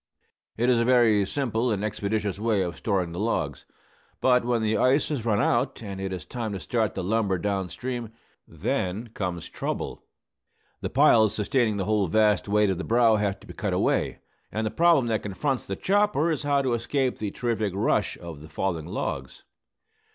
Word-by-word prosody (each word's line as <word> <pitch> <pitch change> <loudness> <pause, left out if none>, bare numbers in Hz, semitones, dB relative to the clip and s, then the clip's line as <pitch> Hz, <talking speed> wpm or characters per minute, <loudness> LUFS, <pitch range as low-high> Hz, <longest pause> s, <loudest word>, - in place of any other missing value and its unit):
It 120 +2 +1
is 125 -2 +4
a - - +3
very 115 -4 +4
simple 125 -1 -1
and 105 -3 -1
expeditious 105 -1 -2
way 110 -3 +1
of 85 -3 -4
storing 95 -5 -1
the 85 - -6
logs. 80 - -2 0.5
But 125 -2 +4
when 120 -2 0
the 110 0 +1
ice 130 +7 +3
has 130 -7 -3
run 105 -2 +2
out, - - +1
and 100 -2 -6
it 95 0 -3
is 90 -4 -5
time 115 -4 -4
to 95 - -4
start 110 -1 -1
the - - -3
lumber 100 -1 +1
down 95 0 -2
stream, 120 -1 -5 0.4
then 100 +6 -2
comes 90 -6 -4
trouble. - - -4 0.8
The - - -2
piles 110 -2 +5
sustaining 110 -1 +1
the 95 - -1
whole 105 -2 +1
vast 105 +4 +2
weight 105 0 +3
of 95 - -3
the - - -3
brow 115 -1 +4
have 100 -2 -1
to - - -15
be - - -10
cut - - -2
away, - - 0 0.3
and 110 +1 -2
the 110 - -1
problem 170 -6 +4
that 110 -2 0
confronts 125 +6 -2
the 95 - -4
chopper 195 - +2
is 155 - -1
how 145 -1 +1
to 130 -2 +1
escape 125 +3 -1
the 105 - -2
terrific 110 -3 -2
rush 100 - +1
of 85 -4 -9
the 80 - -12
falling 80 0 -2
logs. 65 -6 -4
110 Hz, 195 wpm, -26 LUFS, 95-120 Hz, 0.8 s, piles